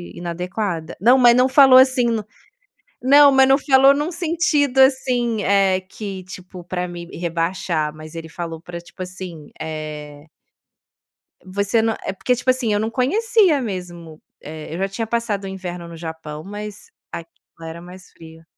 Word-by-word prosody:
inadequada." 175 0 -4
Não, 245 +5 +6
mas 240 -2 +6
não 255 +1 +4
falou 265 -1 +7
assim 260 -2 +4
no 225 -3 -1 0.8
não, 285 +1 +7
mas 265 0 +5
não 270 - +6
falou 270 -1 +5
num 300 +5 -2
sentido 315 -5 0
assim, 250 -5 +2
eh, 195 -1 +2
que, 190 0 -8
tipo, 185 -1 -11
pra 180 0 -4
me 175 -1 -8
rebaixar, 165 -2 -2
mas 155 +1 -11
ele 165 -1 -7
falou 165 -1 -6
pra, 175 0 -8
tipo 185 - -9
assim, 180 -4 -9
eh 150 -2 -7 1.2
Você 200 +4 0
não 225 0 0
é - - -2
porque 250 +6 0
tipo 255 +1 -3
assim, 250 -4 +1
eu 205 - +1
não 220 +1 -1
conhecia 360 - +2
mesmo, 175 -6 -7 0.2
eh, 155 +1 -8
eu - - -4
já 195 +1 -1
tinha 225 +3 -4
passado 225 -4 -2
o - - -5
inverno 180 -2 -7
no 170 - -10
Japão, 160 -2 -7
mas 210 +1 -9 0.2
aquilo 165 0 -11
era 170 +1 -9
mais 180 +1 -13
frio. 160 0 -15
190 Hz, 165 wpm, -20 LUFS, 170-250 Hz, 1.2 s, falou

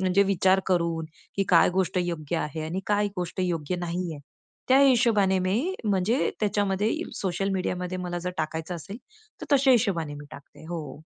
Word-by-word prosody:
म्हणजे 190 +1 +3
विचार 190 0 +3
करून, 170 -3 +1 0.3
की 195 - +2
काय 175 -3 +6
गोष्ट 190 -1 +1
योग्य 170 -2 -3
आहे 155 0 -3
आणि 175 +4 -3
काय 205 0 +2
गोष्ट 180 +1 -3
योग्य 175 -1 -1
नाही 175 0 -3
आहे. 145 - -10 0.5
त्या 260 +1 +6
हिशोबाने 225 -8 +4
मी 230 - 0
म्हणजे 205 +5 +1
त्याच्यामध्ये 205 0 +1 0.3
सोशल 195 +1 -1
मीडियामध्ये 185 -1 -2
मला 175 -1 -3
जर 180 - -1
टाकायचं 160 +2 -3
असेल 175 +5 -7 0.4
तर - - -5
तशा 270 0 +3
हिशोबाने 185 -11 +2
मी 145 0 -9
टाकते 140 +1 -13
हो. 155 -5 -6
185 Hz, 165 wpm, -26 LUFS, 170-200 Hz, 0.5 s, काय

